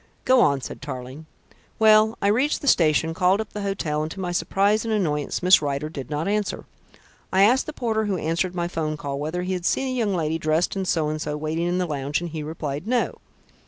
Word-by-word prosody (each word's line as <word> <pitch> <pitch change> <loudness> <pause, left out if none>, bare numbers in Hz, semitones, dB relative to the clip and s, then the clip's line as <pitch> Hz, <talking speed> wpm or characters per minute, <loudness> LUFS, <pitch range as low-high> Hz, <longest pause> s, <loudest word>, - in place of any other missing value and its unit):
"Go 255 -1 +5
on," 140 -7 +3
said - - -8
Tarling. 130 +2 -7 0.5
"Well, 220 0 +5
I - - +3
reached 260 +8 +1
the 285 - -5
station, 160 - +3
called 185 +4 +2
up 220 - -5
the 210 - -4
hotel, 180 -7 -2
and 155 - -3
to 195 - -8
my 180 -2 -2
surprise 200 +4 +1
and 225 - -3
annoyance 155 -8 -1
Miss 185 -1 +6
Rider 145 +1 -2
did 140 -5 -7
not 150 +3 -2
answer. 210 0 -1 0.7
I 190 +1 +4
asked 245 +6 +4
the - - -3
porter 220 -5 -1
who 200 -3 -1
answered 170 +3 -1
my 175 -1 -1
'phone 155 -3 -3
call 140 -1 -4
whether 160 +5 -3
he 185 +1 -2
had 180 -1 -3
seen 265 +8 0
a - - -1
young 205 -4 0
lady 160 -1 -1
dressed 155 +4 0
in 190 -1 -2
so 160 -4 +1
and 155 0 -3
so 150 -1 -3
waiting 160 +3 -2
in 175 +1 0
the 180 - 0
lounge, 145 -2 -2
and 175 -1 -6
he 155 -1 -4
replied 150 +1 -5
'no.' 245 0 0
175 Hz, 230 wpm, -24 LUFS, 155-200 Hz, 0.7 s, Miss